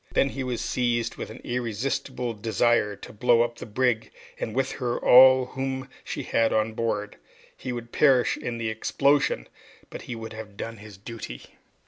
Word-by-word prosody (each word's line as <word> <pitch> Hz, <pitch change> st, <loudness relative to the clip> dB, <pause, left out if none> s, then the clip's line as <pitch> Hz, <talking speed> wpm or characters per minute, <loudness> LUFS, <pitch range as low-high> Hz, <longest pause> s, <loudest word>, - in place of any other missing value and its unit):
Then 135 Hz, -, +3 dB
he 135 Hz, 0 st, -4 dB
was 125 Hz, -2 st, -3 dB
seized 120 Hz, -2 st, 0 dB
with -, -, -5 dB
an 110 Hz, -, -10 dB
irresistible 125 Hz, +1 st, -2 dB
desire 110 Hz, -1 st, +1 dB
to -, -, -11 dB
blow 120 Hz, +2 st, +4 dB
up 120 Hz, 0 st, -4 dB
the 125 Hz, -, -8 dB
brig 115 Hz, 0 st, 0 dB, 0.3 s
and 110 Hz, -, -4 dB
with 135 Hz, 0 st, +1 dB
her, 120 Hz, -3 st, -2 dB
all 130 Hz, 0 st, +7 dB
whom 130 Hz, 0 st, -4 dB
she -, -, -4 dB
had 115 Hz, -1 st, +2 dB
on 110 Hz, 0 st, +1 dB
board. 110 Hz, -2 st, -2 dB, 0.4 s
He 130 Hz, -, -5 dB
would 120 Hz, -1 st, -6 dB
perish 135 Hz, -4 st, +4 dB
in 120 Hz, -1 st, -4 dB
the 115 Hz, -1 st, -2 dB
explosion, 140 Hz, -, +1 dB, 0.4 s
but -, -, -7 dB
he 125 Hz, -, -6 dB
would 110 Hz, 0 st, -7 dB
have 110 Hz, -2 st, -9 dB
done 115 Hz, 0 st, -5 dB
his 105 Hz, -2 st, -12 dB
duty. 100 Hz, -, -8 dB
120 Hz, 175 wpm, -26 LUFS, 110-125 Hz, 0.4 s, all